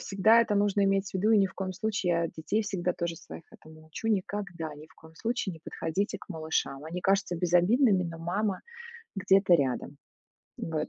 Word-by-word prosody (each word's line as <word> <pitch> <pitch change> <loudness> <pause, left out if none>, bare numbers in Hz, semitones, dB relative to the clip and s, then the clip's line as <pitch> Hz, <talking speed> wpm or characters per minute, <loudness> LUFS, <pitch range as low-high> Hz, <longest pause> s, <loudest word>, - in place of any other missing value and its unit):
всегда 215 +4 +4
это 210 -3 +1
нужно 205 0 +2
иметь 195 0 +1
в - - -23
виду, 195 +4 +2
и 220 - +6
ни 195 - +4
в 190 - -12
коем 190 -1 -4
случае 200 -2 -1
я 170 0 +1
детей 160 +8 -2
всегда 180 -3 -1
тоже 170 -1 -3
своих 165 - -11
этому 155 0 -15
учу: 160 +8 -5
"Никогда, 190 -6 -2
ни 150 +1 -12
в - - -21
коем 160 0 -17
случае 225 0 -2
не 160 - -11
подходите 195 +6 -3
к - - -15
малышам. 155 -3 -2
Они 170 +3 -5
кажутся 195 -1 +1
безобидными, 180 +5 +3
но 165 -2 -6
мама 185 +4 -2 0.5
где-то 195 -2 +4
рядом". 140 -1 -2 0.6
Вот. 155 -2 -3
185 Hz, 195 wpm, -29 LUFS, 165-200 Hz, 0.6 s, и